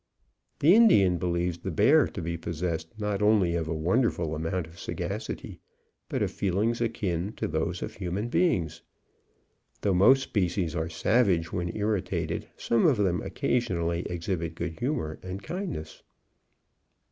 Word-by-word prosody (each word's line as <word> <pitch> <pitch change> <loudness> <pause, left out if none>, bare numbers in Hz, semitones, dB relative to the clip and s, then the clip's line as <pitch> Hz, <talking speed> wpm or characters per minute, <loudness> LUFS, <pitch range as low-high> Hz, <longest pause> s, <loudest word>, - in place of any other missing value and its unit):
The 160 +5 +7
Indian 100 - +5
believes 85 -1 -1
the - - -4
bear 120 - +4
to 90 - -6
be 85 +1 -2
possessed 85 +2 -4
not 105 -1 -1
only 105 -5 +4
of 85 -2 -1
a 80 - -1
wonderful 85 -1 +1
amount 80 +3 -2
of 80 +2 -15
sagacity, - - -5 0.5
but - - 0
of - - -1
feelings 105 +5 0
akin 105 -5 -1
to - - -3
those 80 +3 -2
of - - -5
human 95 +3 -3
beings. 120 - +1 1.0
Though 100 - +2
most 130 +9 +6
species 90 - -1
are 80 -1 -2
savage 90 -2 +2
when 85 -1 -2
irritated, 90 -6 -1
some 115 +5 +2
of 140 -7 +3
them 90 -4 +1
occasionally 85 -9 -1
exhibit 85 -1 -3
good 85 -1 -5
humour 120 - -2
and 95 +2 -6
kindness. 175 - -5
90 Hz, 145 wpm, -28 LUFS, 85-110 Hz, 1.0 s, The